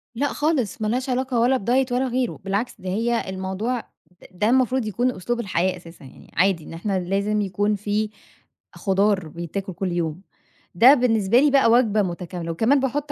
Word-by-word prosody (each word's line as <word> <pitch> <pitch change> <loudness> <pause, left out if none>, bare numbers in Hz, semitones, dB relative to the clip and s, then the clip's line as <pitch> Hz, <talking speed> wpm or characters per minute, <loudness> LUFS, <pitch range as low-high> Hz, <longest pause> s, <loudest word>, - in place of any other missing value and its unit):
لأ 280 +5 0
خالص، 290 - -1
ما 215 - 0
لهاش 255 +4 -1
علاقة 255 -1 0
ولا 250 +3 +3
بدايت 255 +4 +1
ولا 255 +2 +1
غيره، 250 -1 -2
بالعكس، 200 +5 -2
ده 185 - -5
هي 230 +2 -1
الموضوع 190 +6 -3 0.3
د 180 - -21
ده 210 +5 0
المفروض 255 -1 +2
يكون 245 +4 0
أسلوب 240 +4 -3
الحياة 190 -4 0
أساسًا 165 -4 -14
يعني، 130 - -16
عادي 180 -1 +2
إن 165 - -10
إحنا 190 +3 -2
لازم 200 +4 0
يكون 205 +2 0
في 210 +1 -1 0.7
خضار 195 -2 +1
بيتاكل 170 +4 -6
كل 185 +1 -3
يوم. 170 -1 -2 0.5
ده 245 +9 +8
بالنسبة 235 -4 +3
لي 290 +1 +4
بقى 270 -4 +4
وجبة 225 -3 +3
متكاملة 175 -2 -4
وكمان 225 - +2
باحُط 280 +2 -2
210 Hz, 180 wpm, -23 LUFS, 185-250 Hz, 0.7 s, ده